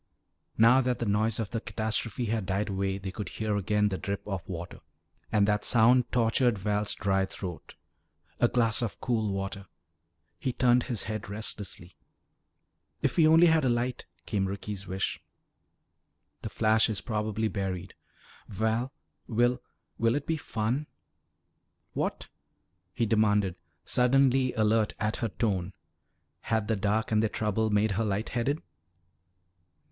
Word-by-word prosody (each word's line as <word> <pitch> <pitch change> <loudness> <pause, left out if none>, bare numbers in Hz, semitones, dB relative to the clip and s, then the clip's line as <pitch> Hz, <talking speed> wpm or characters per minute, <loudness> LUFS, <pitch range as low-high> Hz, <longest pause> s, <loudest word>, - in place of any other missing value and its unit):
Now 120 +4 +6
that 125 -1 0
the 120 - -2
noise 110 +2 +1
of 110 -3 -3
the 115 - -2
catastrophe 110 +2 -2
had 110 -3 -1
died 100 +2 -1
away 95 0 -1
they 95 -1 -6
could 95 -1 -5
hear 110 -1 -2
again 105 +1 +1
the 95 - -3
drip 100 0 -4
of 95 -3 -3
water. 85 -1 -6 0.5
And 100 -1 +3
that 105 0 +1
sound 120 +1 +4
tortured 120 0 +2
Val's 105 +1 0
dry 95 -1 +1
throat. 90 -3 -8 0.6
A 120 - +5
glass 115 -2 +1
of 115 - -3
cool 110 -4 0
water 95 0 -4 0.7
He 130 - -2
turned 125 -1 +3
his 115 -5 -1
head 110 -1 -5
restlessly. 100 -4 -4 1.1
"If - - +1
we 160 -2 +5
only 165 +2 +7
had 160 -2 +4
a 130 - +3
light," 120 +1 -1 0.2
came 100 -3 0
Ricky's 100 0 -5
wish. 95 +1 -2 1.2
"The - - -5
flash 110 0 +3
is 105 -3 -1
probably 110 0 -1
buried." 95 -3 -4 0.5
"Val, 110 +5 -1 0.4
will 120 +2 +2 0.4
will 115 +2 +3
it 145 - -2
be 160 - 0
fun?" 125 0 -2 1.1
"What?" - - -2 0.7
he 115 - +1
demanded, 105 -4 +2 0.3
suddenly 130 +1 +3
alert 110 0 +2
at 105 0 -1
her 115 - -1
tone. 100 -4 -1 0.7
Had 110 -2 -1
the 110 - +1
dark 105 +3 0
and 105 -1 +3
their 110 - +1
trouble 110 +1 0
made 105 +1 +2
her 105 +3 0
light 105 +1 -1
headed? 135 +6 -1
110 Hz, 145 wpm, -29 LUFS, 100-120 Hz, 1.2 s, only